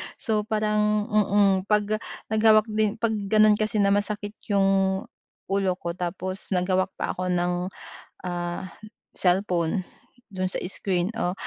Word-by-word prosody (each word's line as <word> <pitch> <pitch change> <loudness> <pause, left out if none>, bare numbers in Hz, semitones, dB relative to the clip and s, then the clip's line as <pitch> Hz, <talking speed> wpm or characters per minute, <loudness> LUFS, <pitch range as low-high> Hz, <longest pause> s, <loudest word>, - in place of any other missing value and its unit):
so 215 -2 -1
parang, 210 -1 +1
mm, 200 -2 +3
'pag 210 0 +1 0.3
nag 220 - +1
hawak 215 -1 +6
din 215 0 +1
'pag 230 0 0 0.2
gano'n 215 0 +5
kasi 215 -1 +1
na 200 - +3
masakit 205 0 -1 0.2
'yung 195 -1 +2 0.5
ulo 195 -2 +1
ko 170 -2 -4
tapos 185 +2 -4
naghawak 185 +1 +1
pa - - -2
ako 185 0 -3
ng, 180 0 0 0.5
ah, 175 +1 -4 0.5
cellphone 180 -1 +1 0.5
do'n 185 -2 -3
sa 185 - -2
screen 185 -2 -1
o, 180 -5 0
195 Hz, 135 wpm, -25 LUFS, 185-210 Hz, 0.5 s, hawak